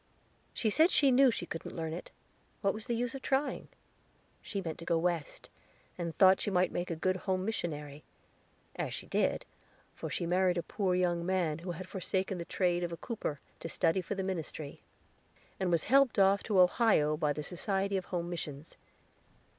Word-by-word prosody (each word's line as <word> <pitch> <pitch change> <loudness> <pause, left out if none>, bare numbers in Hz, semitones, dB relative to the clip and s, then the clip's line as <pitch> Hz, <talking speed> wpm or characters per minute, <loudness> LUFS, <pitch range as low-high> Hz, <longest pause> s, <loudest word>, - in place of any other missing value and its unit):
She 220 - 0
said 320 - +6
she 290 -6 +4
knew 265 +1 +6
she 210 - -2
couldn't 165 - -7
learn 160 -1 -3
it; 175 - -7 0.5
what 195 -1 +2
was 215 +3 -5
the 240 - 0
use 245 +2 -1
of 270 - -6
trying? 270 +3 0 0.7
She 200 - -4
meant 165 -4 -5
to - - -8
go 170 - +2
West, 170 -3 -2 0.5
and 170 -2 -4
thought 190 -1 +6
she - - 0
might 185 -1 +2
make 175 - -3
a 165 - -1
good 185 +4 0
home 185 0 -1
missionary, 150 -8 -4 0.7
as - - -3
she - - -6
did, - - 0 0.5
for - - -6
she - - -2
married 180 +1 +2
a 170 - -1
poor 190 0 0
young 175 -2 +1
man, 170 -4 0
who 175 +2 -7
had 185 +3 -7
forsaken 190 -1 -2
the 170 - -4
trade 175 -1 0
of 170 - -2
a 170 - -5
cooper, 170 - -4 0.2
to 165 - -5
study 165 +3 +2
for 200 - -4
the 190 - -2
ministry, 160 -5 -5 0.8
and 190 -2 0
was 170 -2 +2
helped 270 -1 +4
off 195 0 +5
to 205 -4 +2
Ohio 180 -5 +4
by 150 -1 +1
the 150 +1 -3
Society 195 +3 -1
of 190 -2 -1
Home 175 -2 -3
Missions. 155 -3 -6
180 Hz, 195 wpm, -32 LUFS, 170-200 Hz, 0.8 s, said